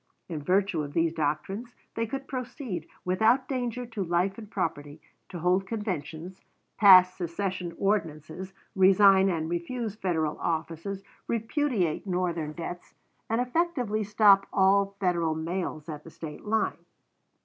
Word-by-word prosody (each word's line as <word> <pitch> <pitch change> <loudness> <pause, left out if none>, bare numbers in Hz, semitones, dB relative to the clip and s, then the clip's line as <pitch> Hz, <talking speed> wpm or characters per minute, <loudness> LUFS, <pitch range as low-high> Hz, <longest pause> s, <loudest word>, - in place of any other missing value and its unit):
In 160 -4 -5
virtue 185 +1 +1
of 145 -1 -6
these 165 -1 +1
doctrines, 165 +10 -3 0.2
they 230 0 -2
could 270 +4 -5
proceed, 245 - -5 0.2
without 220 +8 +3
danger 250 -2 -2
to 225 -4 -4
life 180 +4 0
and 215 -2 -10
property, 155 -7 -3 0.3
to 180 - -7
hold 180 +3 +1
conventions, 180 -5 -5 0.3
pass 185 -3 +8
secession 180 0 -3
ordinances, 185 -2 -2 0.2
resign 195 0 +6
and 160 -3 -1
refuse 195 +7 -3
Federal 165 -7 -1
offices, 170 +4 -3 0.2
repudiate 225 - 0
Northern 175 -4 -1
debts, 175 +2 -7 0.3
and 225 +1 +1
effectively 250 -5 0
stop 205 -1 +5
all 195 +1 +3
Federal 170 -4 +1
mails 165 -1 -3
at 150 -2 -7
the - - -11
State 155 +1 -9
line. 220 +1 0
190 Hz, 130 wpm, -28 LUFS, 165-215 Hz, 0.3 s, pass